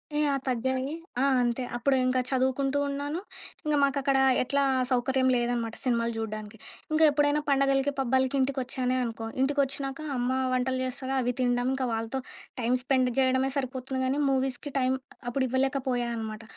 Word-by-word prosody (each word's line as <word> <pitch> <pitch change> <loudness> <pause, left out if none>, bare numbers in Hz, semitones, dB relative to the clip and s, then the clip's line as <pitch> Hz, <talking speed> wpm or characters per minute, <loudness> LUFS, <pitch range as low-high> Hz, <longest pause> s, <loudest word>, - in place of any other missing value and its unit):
Yeah! 290 -2 +2
తగ్గాయి. 260 +3 -1 0.3
ఆ! - - +4 0.2
అంతే. 240 +1 0
అప్పుడు 265 +3 +2
ఇంకా 255 0 +2
చదువుకుంటూ 265 +1 +1
ఉన్నాను. 285 +4 -3 0.5
ఇంకా 300 -1 +2
మాకక్కడ 275 0 +2 0.3
ఎట్లా 280 +2 +1 0.3
సౌకర్యం 260 +1 +2
లేదనమాట 240 -2 -1
సినిమాలు 235 -2 +1
జూడానికి. 215 0 -5 0.3
ఇంకా 315 +1 +3
ఎప్పుడైనా 290 +1 +2
పండగలకి, 275 0 +3
పబ్బాలకి 260 +1 +1
ఇంటికోచ్చానే 260 -1 0
అనుకో, 225 -1 -4 0.2
ఇంటికోచ్చినాక 275 0 0 0.2
అమ్మ 245 +1 0 0.2
వంటలు 255 +1 0
చేస్తది, 260 +1 -4
అవి 245 0 0
తినడం. 245 0 +1
ఇంకా 260 -2 -1
వాళ్ళతో 225 +4 -2 0.4
టైమ్ 240 +2 +2
స్పెండ్ 255 -2 +2
చేయడమే 260 +1 +2
సరిపోతుంది 260 0 -3
కానీ, 270 +3 0
మూవీస్‌కి 265 +2 -1
టైం 255 0 +2 0.4
అప్పుడు 260 +2 0
ఇవ్వలేకపోయాను 260 -2 0
అనమాట. 220 0 -5
260 Hz, 140 wpm, -28 LUFS, 245-275 Hz, 0.5 s, ఆ